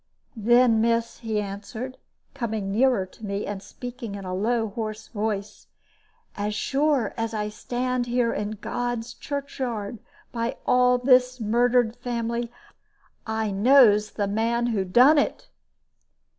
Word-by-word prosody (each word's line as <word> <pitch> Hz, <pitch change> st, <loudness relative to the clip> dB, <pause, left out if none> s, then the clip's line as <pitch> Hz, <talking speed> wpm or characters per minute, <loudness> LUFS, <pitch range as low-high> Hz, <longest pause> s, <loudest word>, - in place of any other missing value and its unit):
"Then, 235 Hz, +1 st, +4 dB
miss," 230 Hz, 0 st, 0 dB
he 220 Hz, -3 st, -2 dB
answered, 210 Hz, +5 st, -6 dB, 0.3 s
coming 220 Hz, -7 st, -3 dB
nearer 235 Hz, -2 st, +3 dB
to 185 Hz, +4 st, -19 dB
me, 200 Hz, 0 st, -3 dB
and 205 Hz, -2 st, -5 dB
speaking 245 Hz, -2 st, -7 dB
in 200 Hz, -1 st, -7 dB
a 185 Hz, -, -4 dB
low, 225 Hz, +3 st, 0 dB
hoarse 215 Hz, +1 st, -5 dB
voice, 210 Hz, -2 st, -4 dB, 0.7 s
"as 210 Hz, +1 st, -2 dB
sure 275 Hz, -3 st, +1 dB
as 225 Hz, 0 st, -2 dB
I 210 Hz, 0 st, -2 dB
stand 245 Hz, +3 st, -2 dB
here 240 Hz, -1 st, +1 dB
in 210 Hz, +1 st, -3 dB
God's 240 Hz, -1 st, -3 dB
churchyard, 250 Hz, -7 st, -4 dB, 0.3 s
by 230 Hz, 0 st, -2 dB
all 250 Hz, 0 st, +4 dB
this 250 Hz, 0 st, +3 dB
murdered 235 Hz, +1 st, +2 dB
family, 235 Hz, -1 st, -3 dB, 0.8 s
I 220 Hz, -1 st, -1 dB
knows 210 Hz, -1 st, +5 dB
the 205 Hz, -2 st, -1 dB
man 230 Hz, +3 st, 0 dB
who 195 Hz, -3 st, 0 dB
done 255 Hz, +11 st, +6 dB
it!" -, -, -2 dB
230 Hz, 130 wpm, -25 LUFS, 210-245 Hz, 0.8 s, done